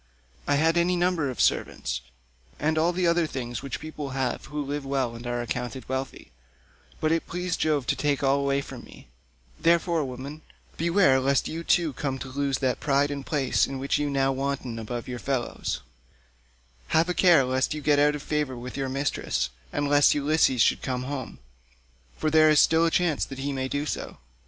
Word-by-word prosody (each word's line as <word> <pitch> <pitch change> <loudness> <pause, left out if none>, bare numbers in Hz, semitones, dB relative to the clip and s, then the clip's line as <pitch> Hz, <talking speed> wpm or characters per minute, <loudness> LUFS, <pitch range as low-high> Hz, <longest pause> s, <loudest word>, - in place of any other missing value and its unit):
I 145 - +3
had 160 +3 +3
any 175 +1 +3
number 175 -5 +1
of 125 - -6
servants, - - 0 0.6
and 155 +1 +1
all 160 +2 +3
the 180 0 -1
other 170 -1 +3
things 120 -4 -5
which 135 -3 -5
people 155 -2 -6
have 130 -2 -1
who 150 0 -4
live 145 +1 -3
well 135 -3 -1
and 120 +1 -8
are 120 0 -2
accounted 125 +2 -4
wealthy, 130 - -5 0.7
but 155 - +1
it 165 0 0
pleased 180 0 -3
Jove 150 -4 +1
to - - +1
take 145 -1 0
all 135 +1 +3
away 140 0 +1
from - - -9
me; - - -15 0.5
therefore, 170 -1 +2
woman, 135 +4 -7 0.3
beware 170 -5 +3
lest 135 +1 +1
you 165 +1 -5
too 165 -3 +2
come 135 +1 -3
to 135 +1 -7
lose 140 0 -1
that 130 -2 0
pride 140 0 +2
and 140 -1 -5
place 140 -4 +1
in 135 - -5
which 135 +2 0
you 145 0 0
now 135 -1 +1
wanton 135 -3 -3
above 120 +2 -5
your 125 -1 -5
fellows; 130 -2 -2 1.1
have 160 - +3
a 180 - 0
care 175 -6 +5
lest 130 +3 0
you 150 - -5
get 145 0 +3
out 150 0 +4
of 145 - -7
favour 150 -4 -1
with 125 +1 -7
your 135 -1 -2
mistress, 135 - -1 0.2
and 145 - -1
lest 145 0 +5
Ulysses 145 -4 +3
should - - +2
come 125 -1 -2
home, 135 0 -5 0.8
for 155 - 0
there 155 0 +6
is 155 -1 +5
still 165 +1 +4
a - - +3
chance 165 -3 +1
that 135 - -6
he 140 +1 -3
may 130 -1 -2
do 145 +2 -2
so. - - -4
140 Hz, 200 wpm, -26 LUFS, 130-155 Hz, 1.1 s, there